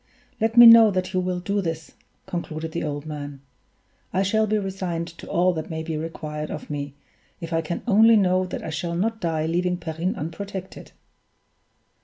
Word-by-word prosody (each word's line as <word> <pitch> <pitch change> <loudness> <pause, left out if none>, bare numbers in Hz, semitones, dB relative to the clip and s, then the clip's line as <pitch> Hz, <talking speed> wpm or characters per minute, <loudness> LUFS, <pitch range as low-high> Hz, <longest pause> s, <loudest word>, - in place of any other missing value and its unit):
"Let 225 +2 0
me 240 - +11
know 230 -1 +10
that 185 -1 -2
you 185 - +1
will 180 0 -2
do 200 +3 -1
this," 165 -3 -5 0.3
concluded 160 -2 -5
the 170 - -3
old 145 -1 -4
man; 145 -2 -7 0.7
"I 190 - +1
shall 220 +3 +1
be 215 +1 +1
resigned 185 -4 -3
to 170 - -12
all 180 +1 +2
that 160 -2 -5
may 160 -1 -4
be 160 -1 -4
required 155 -1 -5
of 150 - -7
me, 145 -1 -5 0.4
if 165 -1 -6
I 165 - +2
can 165 +2 -5
only 225 0 +6
know 185 -2 +2
that 180 - -6
I 160 - -5
shall 170 +2 -3
not 220 +5 -1
die 160 -2 -1
leaving 180 +2 0
Perrine 165 +2 -3
unprotected." 190 +4 -7
175 Hz, 185 wpm, -24 LUFS, 160-195 Hz, 0.7 s, me